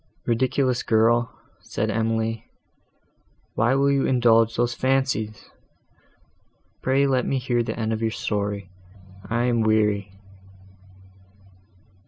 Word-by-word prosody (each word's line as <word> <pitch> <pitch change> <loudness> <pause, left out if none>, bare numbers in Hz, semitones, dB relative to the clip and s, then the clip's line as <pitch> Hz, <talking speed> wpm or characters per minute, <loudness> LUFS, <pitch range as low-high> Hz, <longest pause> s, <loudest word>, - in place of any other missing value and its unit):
"Ridiculous 125 +2 +1
girl!" 115 +1 +2 0.3
said 110 +1 -3
Emily, 115 0 -2 1.0
"why 120 +4 +2
will 140 +1 +3
you 140 -1 +1
indulge 115 -2 +3
those 120 0 0
fancies? 130 -6 -1 1.3
Pray 135 +2 +2
let 130 -3 +1
me 135 - 0
hear 120 -2 0
the 115 - -4
end 110 0 -1
of 110 - -3
your 115 - +1
story, 100 -3 -3 0.6
I 115 +2 0
am 120 -2 +1
weary." 105 -2 +1
115 Hz, 110 wpm, -23 LUFS, 110-125 Hz, 1.3 s, will